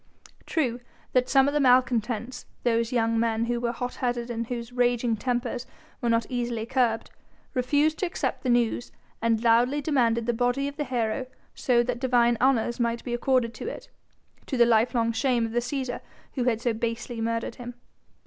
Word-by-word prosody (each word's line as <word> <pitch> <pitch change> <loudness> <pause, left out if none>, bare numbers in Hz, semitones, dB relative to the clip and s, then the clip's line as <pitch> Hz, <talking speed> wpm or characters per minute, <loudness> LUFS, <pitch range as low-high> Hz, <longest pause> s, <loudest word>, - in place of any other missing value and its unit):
True 250 -8 0 0.3
that 255 0 +2
some 270 0 +5
of 285 - 0
the 295 - +2
malcontents 250 -2 +1 0.2
those 230 -1 +1
young 230 -2 +1
men 230 0 +1
who 240 0 -1
were 235 -1 0
hot 245 +1 -4
headed 240 -1 -1
and 230 -1 -3
whose 240 0 -5
raging 245 -1 +2
tempers 245 +2 -2 0.3
were 240 - 0
not 230 -1 +2
easily 240 -3 -2
curbed 235 -3 0 0.4
refused 290 +5 +1
to 375 - 0
accept 345 - -3
the 255 - -2
news 240 0 +1 0.3
and 230 0 +1
loudly 240 +5 +4
demanded 240 -6 +1
the 240 - +1
body 245 +4 0
of 285 - -6
the 295 - -2
hero 245 0 -1 0.3
so 240 -2 +2
that 245 0 -3
divine 240 -2 +3
honours 245 -2 +2
might 235 0 0
be 245 - -4
accorded 240 -1 +1
to - - -7
it, - - -7 0.6
to 265 - -2
the 240 - +6
lifelong 230 0 +2
shame 235 0 +1
of 225 - -5
the 240 - +1
Cæsar 250 +1 -3 0.3
who 250 -3 -1
had 230 -3 +1
so 240 -1 +1
basely 230 +1 -3
murdered 230 0 -2
him. 245 -1 -8
240 Hz, 185 wpm, -26 LUFS, 230-255 Hz, 0.6 s, the